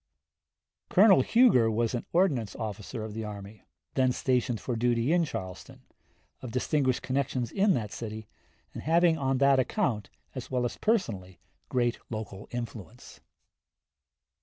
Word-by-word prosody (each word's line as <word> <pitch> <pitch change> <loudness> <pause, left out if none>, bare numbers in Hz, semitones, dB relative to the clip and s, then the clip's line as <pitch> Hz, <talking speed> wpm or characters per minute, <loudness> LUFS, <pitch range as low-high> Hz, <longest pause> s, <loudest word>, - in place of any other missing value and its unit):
Colonel 195 -5 +6
Huger 215 - +4
was 115 +1 0
an 120 - -4
ordnance 140 - +1
officer 110 +1 -5
of 110 -1 -6
the 110 +1 -4
army, 105 0 -9 0.3
then 130 -1 +2
stationed 125 -3 0
for 125 - -3
duty 120 +4 +1
in 175 -1 +3
Charleston, 95 - -7 0.6
of 125 - -6
distinguished 130 +1 0
connections 130 -3 -1
in 195 -1 +3
that 110 -4 -3
city, 110 -2 -6 0.5
and - - -6
having 165 0 +3
on 135 -1 +1
that 140 0 +4
account 125 - -1 0.2
as - - -7
well 125 -1 0
as 120 - -3
personally 105 - -1 0.3
great 120 -2 0
local 110 -3 -6
influence. 120 -1 -8
120 Hz, 135 wpm, -28 LUFS, 110-140 Hz, 0.6 s, Colonel